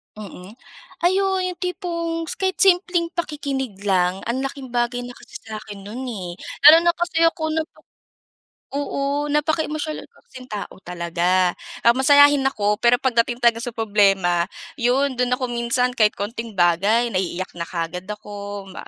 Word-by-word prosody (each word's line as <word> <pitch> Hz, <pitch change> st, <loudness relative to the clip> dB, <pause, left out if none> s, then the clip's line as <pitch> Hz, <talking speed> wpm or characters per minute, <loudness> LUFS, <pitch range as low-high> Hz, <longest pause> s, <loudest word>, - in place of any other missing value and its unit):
Mm. 200 Hz, -2 st, -10 dB, 0.5 s
Ay 360 Hz, +2 st, +3 dB
oo, 380 Hz, -1 st, 0 dB
'yong 365 Hz, -1 st, -3 dB
tipong 335 Hz, -3 st, -3 dB
kahit 380 Hz, -1 st, -1 dB
simpleng 355 Hz, -3 st, +3 dB
pakikinig 270 Hz, -, -3 dB
lang, 185 Hz, -2 st, +1 dB
ang 260 Hz, +3 st, -1 dB
laking 270 Hz, -1 st, -7 dB
bagay 240 Hz, 0 st, -1 dB
na 245 Hz, -, -7 dB
kasi 420 Hz, -, -12 dB
sa 220 Hz, -1 st, -7 dB
akin 205 Hz, -2 st, -10 dB
no'n, 225 Hz, +7 st, -7 dB
eh. 185 Hz, -7 st, -6 dB, 0.3 s
Lalo 330 Hz, +2 st, +7 dB
na 345 Hz, -, +4 dB
kasi 335 Hz, -1 st, +1 dB
ako 325 Hz, -1 st, 0 dB
napa 315 Hz, 0 st, -4 dB, 0.9 s
oo 285 Hz, +1 st, -2 dB
napaka-emosyonal 310 Hz, +1 st, -1 dB
ko -, -, -28 dB
kasing 255 Hz, -1 st, -12 dB
kong 210 Hz, -1 st, -4 dB
tao -, -, -16 dB
kasi 185 Hz, -, -14 dB
talaga. 180 Hz, +1 st, +1 dB, 0.3 s
Ah, 235 Hz, -, +7 dB
masayahin 285 Hz, +2 st, +6 dB
ako, 210 Hz, -5 st, +1 dB
pero 240 Hz, +1 st, +5 dB
pagdating 240 Hz, -1 st, +1 dB
talaga 235 Hz, -1 st, +3 dB
sa 245 Hz, -, -3 dB
problema, 195 Hz, -6 st, +2 dB, 0.4 s
'yon 260 Hz, +3 st, +2 dB
do'n 250 Hz, 0 st, +1 dB
ako 255 Hz, -, -2 dB
minsan, 240 Hz, +1 st, 0 dB
kahit 215 Hz, -3 st, +3 dB
konting 230 Hz, +2 st, -5 dB
bagay 195 Hz, +7 st, +3 dB
naiiyak 185 Hz, 0 st, -2 dB
na 170 Hz, -, -3 dB
kaagad 180 Hz, +1 st, -4 dB
ako, 205 Hz, -1 st, -7 dB
ma -, -, -8 dB
240 Hz, 160 wpm, -22 LUFS, 200-300 Hz, 0.9 s, Lalo